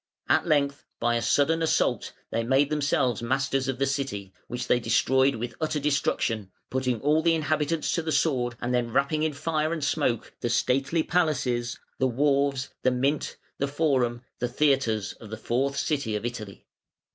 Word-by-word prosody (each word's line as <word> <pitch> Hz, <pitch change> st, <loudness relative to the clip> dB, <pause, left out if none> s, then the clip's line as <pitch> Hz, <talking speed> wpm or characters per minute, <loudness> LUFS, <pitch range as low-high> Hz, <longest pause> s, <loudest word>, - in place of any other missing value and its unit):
At -, -, +3 dB
length 140 Hz, -3 st, +1 dB, 0.2 s
by 120 Hz, 0 st, +2 dB
a 115 Hz, -, 0 dB
sudden 155 Hz, +6 st, +2 dB
assault 160 Hz, -, +1 dB, 0.2 s
they 115 Hz, -, 0 dB
made 135 Hz, +4 st, +2 dB
themselves 135 Hz, -6 st, +1 dB
masters 135 Hz, +2 st, 0 dB
of 135 Hz, -1 st, -1 dB
the 135 Hz, -, +1 dB
city, 130 Hz, -9 st, -3 dB
which 120 Hz, +1 st, -4 dB
they 125 Hz, -, +3 dB
destroyed 130 Hz, +3 st, +3 dB
with 115 Hz, +1 st, -4 dB
utter 155 Hz, -1 st, 0 dB
destruction, 115 Hz, -7 st, 0 dB, 0.2 s
putting 130 Hz, -3 st, 0 dB
all 150 Hz, +2 st, +3 dB
the 165 Hz, 0 st, +3 dB
inhabitants 155 Hz, 0 st, 0 dB
to 170 Hz, -, 0 dB
the 160 Hz, 0 st, -3 dB
sword, 125 Hz, -7 st, +1 dB
and 125 Hz, 0 st, -2 dB
then 120 Hz, -1 st, 0 dB
wrapping 140 Hz, +4 st, +1 dB
in 155 Hz, -1 st, 0 dB
fire 155 Hz, +2 st, -1 dB
and 165 Hz, -3 st, -2 dB
smoke 140 Hz, -5 st, 0 dB
the 120 Hz, -, -1 dB
stately 135 Hz, +7 st, +1 dB
palaces, 130 Hz, -9 st, 0 dB, 0.2 s
the 130 Hz, -, +3 dB
wharves, 140 Hz, +1 st, +1 dB
the 130 Hz, -, +3 dB
mint, 135 Hz, +4 st, -1 dB, 0.2 s
the 140 Hz, -, +1 dB
forum, 130 Hz, -5 st, 0 dB, 0.2 s
the 125 Hz, -, 0 dB
theatres 120 Hz, -6 st, +1 dB
of 110 Hz, -, -11 dB
the 110 Hz, -, -5 dB
fourth 135 Hz, +5 st, -1 dB
city 140 Hz, -9 st, -1 dB
of 105 Hz, -, -3 dB
Italy. 110 Hz, -5 st, -6 dB
135 Hz, 175 wpm, -26 LUFS, 120-150 Hz, 0.2 s, At